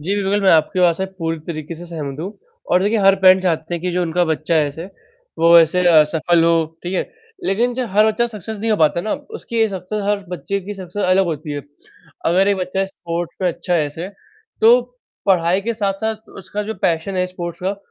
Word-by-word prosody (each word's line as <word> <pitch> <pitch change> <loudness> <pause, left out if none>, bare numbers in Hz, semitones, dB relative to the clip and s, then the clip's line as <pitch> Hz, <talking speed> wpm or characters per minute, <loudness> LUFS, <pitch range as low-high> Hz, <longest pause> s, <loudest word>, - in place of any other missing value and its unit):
जी, 185 +7 -1
बिल्कुल। 200 0 0
मैं 190 - +5
आपके 165 +4 +3
बात 170 -2 +4
से 190 - -2
पूरी 165 -1 -2
तरीक़े 160 -1 -5
से 175 +2 -10
सहमत 150 -4 -6
हूँ 190 +5 -5 0.4
और 180 +1 +4
देखिए 215 +3 +1
हर 195 -1 +5
पैरेंट 185 0 +7
चाहते 170 -2 -1
हैं 170 - -4
कि 180 - -1
जो 180 +1 0
उनका 175 +1 +1
बच्चा 160 0 -1
है 155 -2 +3
ऐसे, 160 +4 -8 0.5
वो 170 +1 +7
ऐसे 165 +2 +3
अ, 155 -3 +7
सफल 165 +2 +1
हो, 165 -1 +3 0.2
ठीक 180 +2 -4
है? - - +1 0.4
लेकिन 240 - +1
जो 255 0 -2
हर 210 +3 +4
बच्चा 220 +2 +1
सक्सेस 220 -1 -7
नहीं 225 - -1
हो 215 - +3
पाता 160 0 +2
ना, 215 +4 -2
उसकी 290 - -8
ये 225 -1 +3
सक्सेस 195 +2 -4
हर 205 0 +2
बच्चे 195 +2 -3
की 205 +3 -7
सक्सेस 190 +1 -6
अलग 185 +1 +3
होती 155 -3 -4
है, 145 - -3 0.7
अगर 185 +4 +3
एक 200 - +2
बच्चा 190 +1 -1
स्पोर्ट्स 170 -2 -5
में 185 - +3
अच्छा 175 +1 -2
है 160 -3 +2
ऐसे, 160 +5 -6 0.5
तो 235 +3 +7 0.5
पढ़ाई 185 0 +3
के 230 +3 -3
साथ-साथ 215 +1 -3
उसका 205 +2 -5
जो 220 +1 -5
पैशन 170 +3 0
है, 180 0 +1
स्पोर्ट्स 175 -2 -7
का, 195 +2 -1
180 Hz, 225 wpm, -19 LUFS, 165-205 Hz, 0.7 s, पैरेंट